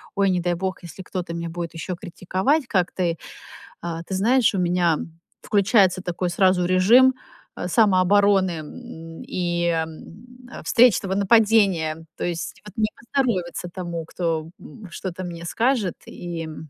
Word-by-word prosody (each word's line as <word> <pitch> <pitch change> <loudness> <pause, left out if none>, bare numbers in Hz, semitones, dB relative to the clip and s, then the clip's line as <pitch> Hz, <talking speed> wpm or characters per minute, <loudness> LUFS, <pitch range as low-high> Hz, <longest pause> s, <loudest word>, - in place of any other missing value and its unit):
Ой, 195 -1 +3
не 180 - +1
дай 175 0 0
бог, 190 +2 -3
если 170 +2 -9
кто-то 180 -2 -5
меня 170 0 -4
будет 170 0 -6
еще 170 +3 -4
критиковать, 190 - -1
как 185 -5 +1
ты. 170 -3 -1 0.7
Э, 170 -1 -3
ты - - -5
знаешь, 235 +5 +3
у - - 0
меня 175 -2 +2 0.4
включается 200 -3 +3
такой 180 0 -2
сразу 185 0 +3
режим, 220 +9 +5 0.4
э, - - -3
самообороны, 195 -1 +4
м, 165 -1 -10
и, 175 -1 -1
м, 180 +10 -6 0.2
встречного 230 -5 +4
нападения, 200 -6 +3
то - - -3
есть 170 -1 -4
вот 210 -1 -12
не 215 -1 +2
поздоровится 215 -9 -2
тому, 170 -3 -5
кто, 165 -1 -2
м, 195 +5 -12
что-то 185 0 -6
мне 170 -1 -7
скажет, 230 -2 0
и, 170 -2 -6
м 155 0 -9
185 Hz, 145 wpm, -23 LUFS, 170-205 Hz, 0.7 s, режим